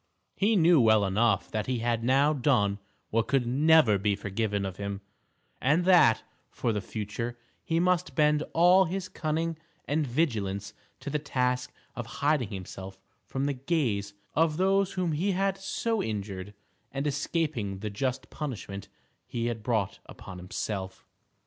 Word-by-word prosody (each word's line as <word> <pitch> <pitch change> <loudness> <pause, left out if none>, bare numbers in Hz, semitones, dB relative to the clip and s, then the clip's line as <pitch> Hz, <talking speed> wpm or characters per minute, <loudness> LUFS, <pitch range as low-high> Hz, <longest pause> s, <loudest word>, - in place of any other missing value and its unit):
He 215 +3 +2
knew 170 -5 +6
well 110 -2 +5
enough 100 +1 +1
that 110 -1 -2
he 130 -1 0
had 115 0 0
now 135 +5 +4
done 120 -8 +2 0.3
what 115 0 +1
could 135 -3 +2
never 135 -4 +5
be 100 +1 +1
forgiven 100 0 -2
him, 100 +1 -5 0.6
and 155 +7 +3
that, 175 -12 +6 0.3
for 115 - -1
the 105 - -1
future, 115 +4 -4 0.3
he 165 0 0
must 180 0 +1
bend 150 -1 +3
all 180 +3 +6
his 185 +2 -3
cunning 160 0 -2 0.3
and 150 0 0
vigilance 105 -8 -1 0.3
to 145 - -5
the 150 - 0
task 125 -3 -1 0.2
of 120 -2 -5 0.2
hiding 145 -7 +2
himself 95 -1 -7 0.3
from 135 +1 -2
the 145 - 0
gaze 125 -9 -1 0.2
of 160 -1 +2
those 195 +1 +2
whom 180 -3 0
he 180 +6 0
had 195 +1 0
so 225 +2 -1
injured, 100 -2 -4 0.4
and 135 +1 -3
escaping 145 - -1
the 105 +1 -5
just 130 +4 -3
punishment 105 -9 -5 0.4
he 115 -1 -3
had 120 -2 -2
brought 110 -3 -1
upon 90 - -10
himself. 95 +1 -5
125 Hz, 150 wpm, -28 LUFS, 105-160 Hz, 0.6 s, knew